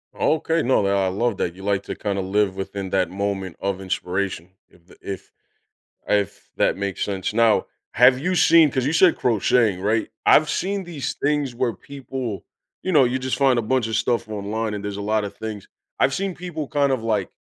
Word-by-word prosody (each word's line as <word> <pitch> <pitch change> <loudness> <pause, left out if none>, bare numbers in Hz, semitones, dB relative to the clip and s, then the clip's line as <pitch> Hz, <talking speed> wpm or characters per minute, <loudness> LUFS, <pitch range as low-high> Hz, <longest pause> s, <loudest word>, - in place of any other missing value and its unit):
Okay, 160 +1 +1
no, 130 -3 +3
that 100 0 +2
I 95 -1 +2
love 105 +2 -1
that, 85 - -1
you 95 +1 -12
like 100 -1 0
to - - -6
kinda 100 -2 -2
live 95 0 0
within 95 0 -5
that 90 -3 +1
moment 95 -2 -3
of 100 -1 -2
inspiration, 95 -1 -3 0.2
if 85 0 -25
th - - -18
if 95 -2 -7 0.8
if 100 -1 -1
that - - +2
makes 100 -1 -2
sense. 95 -1 -2
Now, 115 -1 +3 0.2
have 125 +2 +6
you 180 +7 -1
seen 165 -4 +6
'cause 130 -1 -1
you 150 - 0
said 175 +1 +5
crocheting, 115 -4 +2
right? 110 +3 0 0.2
I've 155 0 +5
seen 195 +3 -1
these 165 -6 -4
things 145 -3 -1
where 120 -2 0
people 130 -6 -6 0.4
you 185 - -1
know, 145 -5 +6
you 125 +1 0
just 130 0 -2
find 135 -3 +3
a - - +1
bunch 125 +1 0
of 110 - -2
stuff 120 -3 0
online 105 +1 -3
and 105 -1 -5
there's 100 -1 -4
a - - -4
lotta 105 0 0
things 105 -1 -7 0.3
I've 135 - +3
seen 195 -1 -2
people 170 -5 -6
kind 140 -1 +1
of, 125 -4 -1
like 105 -5 0
110 Hz, 205 wpm, -22 LUFS, 100-135 Hz, 0.8 s, have